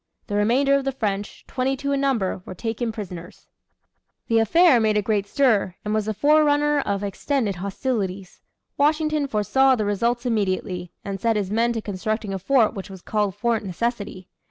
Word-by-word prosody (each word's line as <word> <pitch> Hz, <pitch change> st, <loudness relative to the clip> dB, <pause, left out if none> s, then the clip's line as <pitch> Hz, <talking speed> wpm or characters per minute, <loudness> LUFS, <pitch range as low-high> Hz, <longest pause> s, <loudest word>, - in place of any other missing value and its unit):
The -, -, -7 dB
remainder 245 Hz, +7 st, +3 dB
of 275 Hz, 0 st, +2 dB
the 270 Hz, -, -1 dB
French, 205 Hz, -5 st, -4 dB
twenty 265 Hz, +1 st, -1 dB
two 280 Hz, +1 st, -2 dB
in 275 Hz, 0 st, +1 dB
number, 230 Hz, -10 st, 0 dB
were 185 Hz, -, -9 dB
taken 225 Hz, +3 st, -3 dB
prisoners. 180 Hz, -5 st, -8 dB, 0.8 s
The 230 Hz, -1 st, +4 dB
affair 275 Hz, -, +5 dB
made 215 Hz, -1 st, +2 dB
a -, -, +3 dB
great 205 Hz, -1 st, 0 dB
stir, 215 Hz, -9 st, +2 dB
and 210 Hz, -, -1 dB
was 215 Hz, -1 st, 0 dB
the 215 Hz, -, -1 dB
forerunner 295 Hz, +2 st, +3 dB
of 200 Hz, -6 st, -2 dB
extended 205 Hz, 0 st, -1 dB
hostilities. 195 Hz, -1 st, -3 dB, 0.4 s
Washington 305 Hz, 0 st, +2 dB
foresaw 265 Hz, +4 st, +3 dB
the 215 Hz, -3 st, -1 dB
results 235 Hz, +4 st, 0 dB
immediately, 185 Hz, -5 st, -1 dB
and 195 Hz, -1 st, -4 dB
set 230 Hz, -1 st, +2 dB
his 200 Hz, -2 st, -2 dB
men 230 Hz, +2 st, +2 dB
to 225 Hz, -, -3 dB
constructing 210 Hz, +1 st, -3 dB
a 195 Hz, -, -3 dB
fort 230 Hz, +3 st, +3 dB
which 195 Hz, 0 st, -7 dB
was 190 Hz, -2 st, -11 dB
called 210 Hz, -3 st, -1 dB
Fort 235 Hz, -2 st, 0 dB
Necessity. 200 Hz, -1 st, -3 dB
220 Hz, 180 wpm, -23 LUFS, 200-265 Hz, 0.8 s, affair